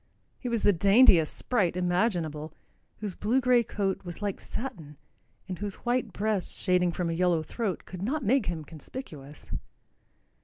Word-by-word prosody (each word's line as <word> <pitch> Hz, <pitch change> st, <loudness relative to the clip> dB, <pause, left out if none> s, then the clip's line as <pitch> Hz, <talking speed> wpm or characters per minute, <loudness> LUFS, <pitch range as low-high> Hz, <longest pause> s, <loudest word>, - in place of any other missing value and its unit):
He 250 Hz, -, -4 dB
was 230 Hz, -2 st, -1 dB
the 205 Hz, -, +5 dB
daintiest 195 Hz, -3 st, +6 dB
sprite 190 Hz, -8 st, 0 dB
imaginable, 175 Hz, -5 st, 0 dB, 0.5 s
whose 205 Hz, -3 st, -1 dB
blue 225 Hz, +8 st, +1 dB
gray 250 Hz, -1 st, +4 dB
coat 200 Hz, -4 st, -2 dB
was 175 Hz, -2 st, -7 dB
like 205 Hz, -2 st, -2 dB
satin 160 Hz, -, -6 dB, 0.5 s
and 185 Hz, -2 st, -5 dB
whose 205 Hz, -1 st, -3 dB
white 240 Hz, -2 st, +1 dB
breast 205 Hz, -1 st, -1 dB
shading 180 Hz, -1 st, +2 dB
from 170 Hz, 0 st, -2 dB
a -, -, -1 dB
yellow 170 Hz, -2 st, +2 dB
throat 205 Hz, +2 st, -3 dB
could 180 Hz, -1 st, -8 dB
not 270 Hz, +8 st, -1 dB
make 250 Hz, +1 st, +2 dB
him 165 Hz, -3 st, -3 dB
conspicuous. 150 Hz, -, -10 dB
190 Hz, 155 wpm, -28 LUFS, 170-230 Hz, 0.5 s, daintiest